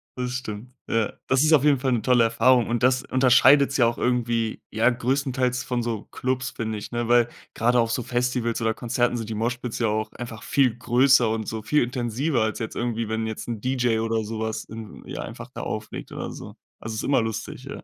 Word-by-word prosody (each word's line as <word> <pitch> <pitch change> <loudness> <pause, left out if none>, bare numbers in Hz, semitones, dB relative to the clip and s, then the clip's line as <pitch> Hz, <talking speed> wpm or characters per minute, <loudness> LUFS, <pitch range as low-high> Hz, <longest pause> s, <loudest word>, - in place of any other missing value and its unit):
Das 125 -1 -3
stimmt. 125 -1 -6 0.2
Ja. 115 -2 0
Das 130 +2 +3
ist 155 +1 +4
auf 145 -3 +5
jeden 145 -2 +4
Fall 130 0 0
'ne 120 -3 +1
tolle 120 +1 +4
Erfahrung 115 +2 +3
und 120 -1 0
das 130 +1 +3
unterscheidet's 130 +2 +5
ja 120 - +5
auch 120 - -2
irgendwie, 120 -2 0
ja, 115 +3 +3
größtenteils 125 0 0
von 120 -2 -2
so 115 -3 -3
Clubs, 130 0 -2
finde 110 -1 -4
ich, - - -9
ne, 120 -1 -2
weil 120 0 +4 0.3
grade 120 +2 +2
auf 115 -1 +1
so 120 - 0
Festivals 120 -1 -1
oder 110 0 +1
Konzerten 120 +1 0
sind 115 -2 -5
die 110 - -3
Moshpits 120 +1 -2
ja 115 - +2
auch 110 +1 -1
einfach 115 -2 -8
viel 130 -5 +2
größer 125 0 +4
und 110 -1 -2
so 110 -1 -4
viel 150 +4 +2
intensiver 125 +3 -1
als 110 0 0
jetzt 110 - -5
irgendwie, 115 -2 -2
wenn 110 0 -1
jetzt 110 0 -6
'n 115 -3 -4
DJ 125 -3 +1
oder 115 0 0
sowas 110 0 -3
in 110 -1 -10
ja, - - -5
einfach - - -8
da - - -6
auflegt - - -6
oder - - -5
so. - - -10 0.2
Also, 110 0 -6
ist - - -3
immer 140 -4 +2
lustig, 110 +3 -5
ja. 140 - -8
120 Hz, 220 wpm, -24 LUFS, 110-125 Hz, 0.3 s, auf